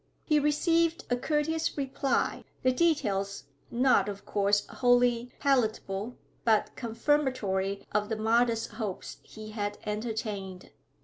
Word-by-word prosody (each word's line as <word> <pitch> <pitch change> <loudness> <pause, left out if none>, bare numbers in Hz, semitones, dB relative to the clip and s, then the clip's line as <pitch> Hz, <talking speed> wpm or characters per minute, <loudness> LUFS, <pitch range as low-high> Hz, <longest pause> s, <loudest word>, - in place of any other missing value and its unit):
He 305 -2 +3
received 330 +3 +2
a - - +4
courteous 315 +5 -1
reply, 275 0 0 0.2
the 255 - +4
details 205 - 0 0.3
not 250 -3 +3
of 200 0 -7
course 205 0 +2
wholly 245 -1 +2
palatable, 220 -4 0 0.3
but 220 -2 +3
confirmatory 230 -6 0
of 210 0 0
the 220 - -1
modest 230 +1 +2
hopes 210 -3 -5
he 215 0 -10
had 205 -1 -3
entertained. 210 -3 -4
230 Hz, 115 wpm, -29 LUFS, 205-270 Hz, 0.3 s, a